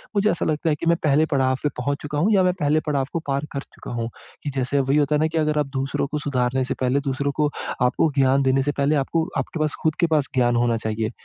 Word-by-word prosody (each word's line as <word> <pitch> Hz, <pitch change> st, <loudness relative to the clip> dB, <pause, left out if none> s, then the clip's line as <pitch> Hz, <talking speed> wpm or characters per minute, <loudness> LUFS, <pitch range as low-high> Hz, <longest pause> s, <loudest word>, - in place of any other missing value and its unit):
मुझे 205 Hz, +1 st, +3 dB
ऐसा -, -, -1 dB
लगता 155 Hz, +1 st, 0 dB
है 150 Hz, -, +2 dB
कि -, -, -4 dB
मैं 170 Hz, -, +5 dB
पहले 150 Hz, +1 st, +4 dB
पड़ाव 130 Hz, -2 st, +2 dB
पे 150 Hz, -, +2 dB
पहुँच 140 Hz, +3 st, -1 dB
चूका 145 Hz, 0 st, -4 dB
हूँ, 200 Hz, +8 st, +3 dB
या 195 Hz, -, +5 dB
मैं 180 Hz, -, +3 dB
पहले 150 Hz, 0 st, +2 dB
पड़ाव 140 Hz, -3 st, 0 dB
को 165 Hz, -, 0 dB
पार 140 Hz, 0 st, 0 dB
कर 140 Hz, -, -3 dB
चुका -, -, -9 dB
हूँ। 115 Hz, -1 st, -3 dB, 0.3 s
कि 145 Hz, -, -2 dB
जैसे 135 Hz, +2 st, 0 dB
वही 135 Hz, +2 st, +2 dB
होता 150 Hz, 0 st, +2 dB
है -, -, +2 dB
ना 155 Hz, -, +3 dB
कि 160 Hz, +1 st, -4 dB
अगर 150 Hz, -1 st, +1 dB
आप 150 Hz, -, +1 dB
दूसरों 135 Hz, +1 st, -1 dB
को 150 Hz, +1 st, -3 dB
सुधारने 130 Hz, -2 st, 0 dB
से 130 Hz, -, -2 dB
पहले 130 Hz, +2 st, +2 dB
दूसरों 140 Hz, 0 st, -1 dB
को 150 Hz, -1 st, +2 dB, 0.3 s
आपको 125 Hz, +6 st, +3 dB
ज्ञान 135 Hz, 0 st, +3 dB
देने 135 Hz, 0 st, +2 dB
से 145 Hz, -, 0 dB
पहले 140 Hz, +2 st, +2 dB
आपको 155 Hz, +3 st, 0 dB
आपके 175 Hz, -, -3 dB
पास 155 Hz, -1 st, 0 dB
खुद 155 Hz, -1 st, +1 dB
के 170 Hz, -, +3 dB
पास 155 Hz, -4 st, +1 dB
ज्ञान 120 Hz, -1 st, +3 dB
होना 120 Hz, -1 st, +2 dB
चाहिए। 110 Hz, 0 st, -2 dB
140 Hz, 270 wpm, -23 LUFS, 130-155 Hz, 0.3 s, मैं